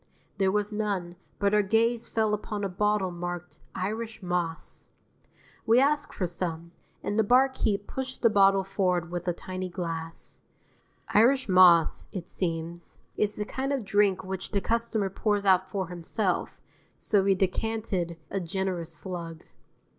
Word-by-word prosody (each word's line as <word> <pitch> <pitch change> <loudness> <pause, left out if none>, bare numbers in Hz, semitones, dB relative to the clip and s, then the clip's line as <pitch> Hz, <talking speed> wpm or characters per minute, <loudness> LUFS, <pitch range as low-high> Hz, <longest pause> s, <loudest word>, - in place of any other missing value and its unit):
There 190 -1 +3
was 210 +1 0
none, 200 -5 -2 0.2
but 200 0 +1
our 210 - +5
gaze 225 +3 +1
fell 220 -1 +1
upon 210 0 -3
a 200 - 0
bottle 205 0 +1
marked 175 0 -6 0.2
"Irish 220 +3 -4
Moss." 175 -2 -2 0.8
We 230 +2 +6
asked 290 +2 +2
for 185 - -2
some, 170 -1 -4 0.3
and 205 - -1
the - - +5
barkeep 245 -4 +2
pushed 265 +2 -6
the - - +8
bottle 195 -1 +5
forward 180 -3 0
with 175 0 -4
a 175 - +2
tiny 185 +1 -5
glass. 165 -2 -6 0.7
Irish 260 +5 +4
Moss, 180 -3 +5
it 180 -4 -6
seems, 170 -1 -4 0.2
is 210 0 0
the 210 - -3
kind 265 +5 -3
of 270 -6 -1
drink 200 -2 +2
which 190 0 -5
the 200 - 0
customer 225 -2 0
pours 205 0 0
out 190 -1 +4
for 190 -4 -3
himself, 180 +2 -2 0.4
so 205 -2 +2
we 195 0 +3
decanted 190 -3 -1
a 195 - -1
generous 180 -1 -3
slug. 170 -3 -7
195 Hz, 150 wpm, -28 LUFS, 175-210 Hz, 0.8 s, the